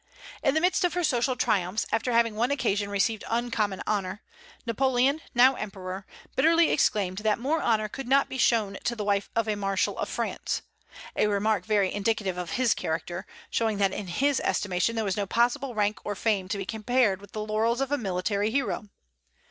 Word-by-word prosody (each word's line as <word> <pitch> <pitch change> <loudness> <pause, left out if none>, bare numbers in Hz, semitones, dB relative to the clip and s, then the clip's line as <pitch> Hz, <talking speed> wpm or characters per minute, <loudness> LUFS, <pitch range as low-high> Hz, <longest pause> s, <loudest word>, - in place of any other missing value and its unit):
In 275 -1 +2
the 315 - +3
midst 365 +2 +2
of 355 -1 +1
her 355 - 0
social 255 -3 +1
triumphs, 200 -4 0
after 235 +3 0
having 230 -1 +3
on 210 - -8
one 240 +2 +2
occasion 210 -7 0
received 205 +2 0
uncommon 225 -4 -1
honor, 195 -1 -2 0.4
Napoleon, 260 +4 +2
now 255 +2 +7
emperor, 190 -3 -6 0.3
bitterly 330 +4 +4
exclaimed 195 -8 +1
that 215 0 +1
more 285 +7 0
honor 215 -2 +2
could 270 +4 -7
not 275 +2 +4
be 260 - -6
shown 215 -5 +2
to 240 - 0
the 215 - -3
wife 200 -1 0
of 230 -1 +1
a 215 - 0
marshal 195 -1 0
of - - -2
France, - - -3 0.5
a - - +3
remark 205 -1 0
very 205 -3 +2
indicative 205 -3 -1
of 175 -2 -4
his 255 -3 +3
character, 175 +3 -4 0.2
showing 220 -2 0
that 195 -1 +2
in 200 - -5
his 275 +10 +1
estimation 195 +4 0
there 225 -1 -1
was 195 -1 -1
no 200 -1 -1
possible 245 +4 +1
rank 210 0 +1
or 205 - -3
fame 200 -2 0
to 200 +2 -2
be 195 - -4
compared 220 -2 +1
with 200 0 -15
the 215 - -3
laurels 220 +3 +1
of 270 0 -1
a 290 - +2
military 200 +1 -1
hero. 235 -4 -2
215 Hz, 195 wpm, -27 LUFS, 200-245 Hz, 0.5 s, now